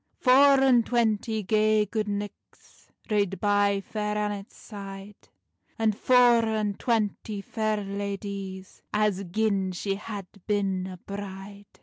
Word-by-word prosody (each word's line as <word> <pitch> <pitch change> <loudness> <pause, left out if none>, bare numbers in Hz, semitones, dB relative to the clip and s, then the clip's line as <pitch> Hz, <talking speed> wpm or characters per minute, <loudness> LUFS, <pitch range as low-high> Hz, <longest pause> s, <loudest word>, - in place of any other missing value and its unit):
Four 275 +2 +6
and 255 -3 +5
twanty 220 -2 0
gay 215 +1 +3
gude 215 +1 -2
knichts 205 0 -8 0.2
Rade 200 -2 +1
by 205 -1 +2
Fair 210 +1 -3
Annet's 205 -1 -3
side, 200 -1 -10 0.5
And 220 -2 +1
four 245 0 +5
and 215 -2 -1
twanty 215 -3 -1
fair 215 +1 -1
ladies, 200 -1 -5
As 210 -2 +1
gin 195 0 0
she 195 +2 -2
had 205 -2 -6 0.2
bin 195 -3 0
a 185 -1 -8
bride. 200 +1 -8
205 Hz, 120 wpm, -27 LUFS, 195-220 Hz, 0.5 s, Four